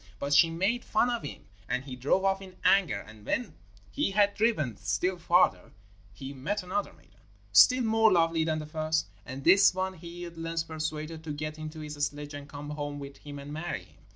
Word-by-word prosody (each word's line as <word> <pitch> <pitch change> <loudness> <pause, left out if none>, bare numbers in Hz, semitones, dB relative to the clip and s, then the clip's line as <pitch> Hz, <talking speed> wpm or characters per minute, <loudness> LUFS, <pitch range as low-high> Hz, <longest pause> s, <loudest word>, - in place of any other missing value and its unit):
But 140 +5 -2
she 165 +2 +7
made 195 +9 0
fun 240 +3 +2
of 240 - -1
him, 145 - -8 0.2
and 125 +1 -1
he 135 -2 -7
drove 145 +10 +1
off 195 0 +2
in 185 -1 -11
anger. 165 - +3 0.2
When 240 - -2 0.4
he 105 - 0
had 200 0 +3
driven 210 - +1
still 105 - -1
farther 170 - +3 0.4
he 135 +7 -8
met 185 +10 -3
another 190 +3 -2
maiden, 100 +1 -24 0.3
still 245 - +7
more 225 -1 +4
lovely 165 -2 +3
than 160 -1 0
the 155 - -5
first, 155 +1 -1 0.2
and 130 +2 -6
this 190 +3 +6
one 190 0 -1
he 175 0 -8
at 170 -1 -10
length 165 0 -2
persuaded 155 0 -4
to 160 - -5
get 155 +1 -5
into 155 0 -7
his 150 -1 -5
sledge 145 0 -3
and 145 0 -8
come 145 +1 -7
home 145 -1 -4
with 140 -1 -8
him 145 0 -9
and 140 +1 -8
marry 155 - -4
him. 80 -4 -23
155 Hz, 205 wpm, -29 LUFS, 145-185 Hz, 0.4 s, she